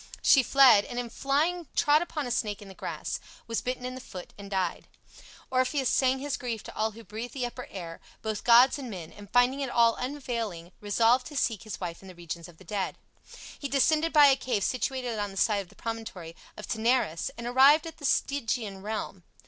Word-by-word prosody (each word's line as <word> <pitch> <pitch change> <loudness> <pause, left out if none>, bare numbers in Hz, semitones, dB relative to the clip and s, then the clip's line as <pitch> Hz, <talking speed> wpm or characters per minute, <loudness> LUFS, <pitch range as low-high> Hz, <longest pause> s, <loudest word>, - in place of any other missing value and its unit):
She 270 - +7
fled, 255 -5 +6
and 240 - -7
in 240 -2 -3
flying 310 +7 0
trod 295 +1 +4
upon 310 -4 -3
a 245 - -4
snake 210 -4 -1
in 205 - -11
the - - -10
grass, - - -5 0.3
was 230 -1 -2
bitten 250 0 -3
in 255 - -4
the 255 - -8
foot, 180 -7 -10
and 200 -1 -10
died. 190 -3 -2 0.6
Orpheus 260 +1 +1
sang 260 0 +3
his 280 +1 -3
grief 235 -4 -4
to - - -10
all 220 0 0
who 230 +2 -12
breathed 225 +4 -7
the 255 -2 -1
upper 245 +1 -7
air, 170 -4 -8 0.2
both 215 -2 -3
gods 245 +4 +6
and 260 -3 -6
men, 175 -6 -7
and 205 -1 -13
finding 245 +4 +3
it 275 -2 -2
all 235 -1 +4
unavailing 235 -10 -4
resolved 230 +4 +3
to 295 - -7
seek 225 -6 0
his 215 - -7
wife 170 -2 -5
in 190 - -13
the 185 - -11
regions 170 -1 -7
of 175 -2 -16
the 190 - -16
dead. 195 +1 -3 0.6
He 285 - -3
descended 310 +4 +2
by 295 -2 +7
a 275 -1 +6
cave 250 -7 -2
situated 250 -3 -2
on 205 0 -2
the 195 - -11
side 205 0 +2
of 185 - -12
the - - -19
promontory 220 -8 -6 0.2
of - - -8
Taenarus 220 -7 +1
and 235 - -6
arrived 270 +6 +6
at 325 -1 -8
the 290 - -7
Stygian 230 -8 -1
realm. 205 -2 -4
235 Hz, 215 wpm, -28 LUFS, 205-265 Hz, 0.6 s, She